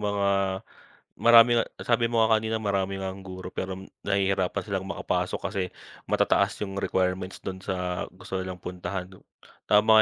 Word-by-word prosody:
mga 100 -1 0 0.9
marami 120 0 +7
nga 115 - +4 0.2
sabi 115 0 +2
mo 115 - +2
nga 110 0 +5
kanina 110 0 -1
marami 100 -2 -1
ngang 95 0 -5
guro, 95 -1 -7
pero 95 0 -3 0.2
nahihirapan 95 -1 +1
silang 95 -2 -2
makapasok 100 - -1
kasi 95 0 -2 0.5
matataas - - +3
yung 95 -2 -4
requirements 95 -1 -1
dun 95 0 -6
sa 90 -2 -2
gusto 95 +1 -8
nilang 95 -1 -4
puntahan. 90 +1 -5 0.6
Tama 105 +1 +4
95 Hz, 145 wpm, -27 LUFS, 95-105 Hz, 0.9 s, marami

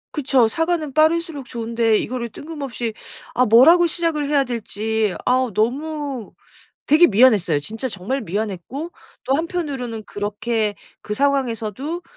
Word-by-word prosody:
그쵸. 265 -5 +3
사과는 325 +1 -1
빠를수록 315 -2 +1
좋은데 230 -2 0
이거를 240 +1 -3
뜬금없이 275 -5 -5 0.4
아 250 - +3
뭐라고 315 +11 +6
시작을 325 -3 0
해야 285 -1 +3
될지 220 -4 -2
아 255 +1 +2
너무 275 +1 -2 0.5
되게 315 +4 +6
미안했어요. 205 - +4
진짜 225 - -4
정말 220 +6 -3
미안했고 215 - -4 0.3
또 265 - +1
한편으로는 280 - -4
그렇게 210 +1 -2 0.3
그 210 - -4
상황에서도 275 - -1
255 Hz, 310 characters per minute, -21 LUFS, 220-300 Hz, 0.5 s, 뭐라고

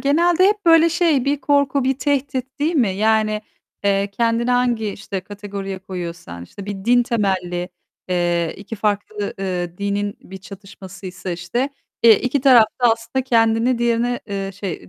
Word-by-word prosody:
genelde 340 +5 +3
hep 415 -2 -1
böyle 330 0 +6
şey 330 -6 +2
bir 280 0 0
korku 280 -2 +2
bir 265 0 0
tehdit 270 -2 -2
değil 310 +4 0
mi? 250 -9 +3
Yani, 215 +2 +1 0.4
eee, 200 0 +1
kendini 230 +3 0
hangi 245 -3 +1
işte 200 -1 -5
kategoriye 200 -1 -7
koyuyorsan, 170 - -7
işte 195 - -11
bir 200 -1 -6
din 245 +1 +4
temelli, 185 -6 -1 0.4
eee, 175 -2 0
iki 210 +3 -8
farklı, 205 0 -2
ııı, 180 -2 -3
dinin 200 0 -2
bir 190 +1 -11
çatışması 195 -1 -11
ise 185 0 -6
işte, 185 +11 -2 0.3
eee, 225 -3 +7
iki 255 +3 0
taraf 250 -4 +7 0.2
da 240 -2 +6
aslında 230 +3 -3
kendini 230 0 +2
diğerine, 240 +1 0
eee, 195 -2 -4
şey, 185 - -6
215 Hz, 155 wpm, -20 LUFS, 195-250 Hz, 0.4 s, eee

